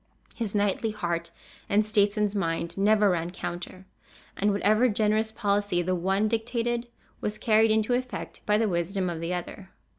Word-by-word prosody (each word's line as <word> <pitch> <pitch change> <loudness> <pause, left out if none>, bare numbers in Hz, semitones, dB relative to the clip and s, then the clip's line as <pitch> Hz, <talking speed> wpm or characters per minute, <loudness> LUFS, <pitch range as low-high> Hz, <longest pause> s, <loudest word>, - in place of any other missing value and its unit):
His 220 -4 -4
knightly 205 +2 +1
heart 170 -5 -3 0.4
and 210 +1 +3
statesman's 210 -1 +2
mind 170 -4 -2
never 205 0 +4
ran 170 -1 -1
counter, 180 +1 -6 0.5
and 205 +1 +1
whatever 215 +4 +3
generous 215 +1 +1
policy 205 -5 0
the 185 +2 0
one 190 +4 +1
dictated, 235 +1 -1 0.3
was 210 0 -3
carried 220 -1 +3
into 220 +2 +2
effect 255 +1 -4
by 210 0 +4
the 225 0 +2
wisdom 180 0 -1
of 165 - -5
the 170 +2 -2
other. 190 +2 -7
205 Hz, 155 wpm, -27 LUFS, 185-220 Hz, 0.5 s, never